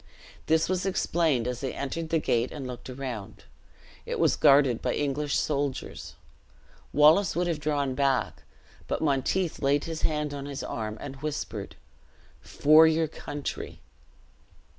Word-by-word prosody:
This 160 0 +3
was 185 0 -1
explained 165 -9 +1
as 125 0 -3
they 135 -2 -3
entered 160 +4 -4
the 165 - +2
gate 120 -5 0
and 145 -3 -6
looked 125 0 -8
around. 125 -6 -6 0.6
It - - -4
was - - +3
guarded 140 -5 +4
by - - -1
English 145 0 -1
soldiers. 140 -3 -3 0.8
Wallace 155 +7 +5
would 175 +1 +1
have 170 -3 -1
drawn 145 -3 -1
back; 135 -1 0 0.5
but - - -2
Monteith 155 +5 0
laid 140 +1 +2
his 165 -1 -5
hand 150 -2 -1
on 140 0 -6
his 140 -1 -5
arm, 110 -1 -4
and 135 -1 -7
whispered, 135 -8 -5 0.7
"For 155 +2 +5
your 160 0 +2
country!" 145 -1 -6
145 Hz, 140 wpm, -27 LUFS, 135-160 Hz, 0.8 s, Wallace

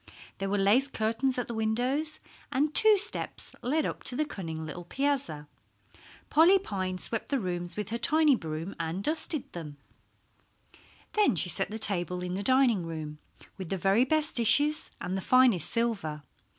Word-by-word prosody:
There 195 0 -2
were 205 - 0
lace 210 +8 +3
curtains 240 +1 -1
at 245 - -2
the 235 - -5
windows, 250 +8 -1 0.3
and 295 +3 0
two 435 -2 +6
steps 415 +3 -4
led 300 +5 0
up - - -4
to 250 - +1
the 305 - 0
cunning 165 - -6
little 160 +3 -7
piazza. 265 - -2 0.8
Polly 335 +6 +6
Pine 190 - -4
swept 225 +4 -5
the 280 - +1
rooms 175 -3 -4
with 210 -1 -4
her 235 +2 -3
tiny 305 -1 +4
broom 160 -1 -6
and 165 +4 -3
dusted 310 +1 -1
them. 150 -4 -8 1.4
Then 420 - +3
she 175 +2 +1
set 175 - +4
the 215 - -5
table 180 -4 -1
in 180 0 -4
the 190 - -3
dining 250 -4 +3
room 155 -2 -6 0.4
with 185 -4 -6
the 195 - -1
very 195 +6 +3
best 305 +2 +2
dishes 290 +6 +3
and 185 - -4
the 190 - -2
finest 240 - +4
silver. 200 -11 -2
220 Hz, 170 wpm, -28 LUFS, 180-275 Hz, 1.4 s, two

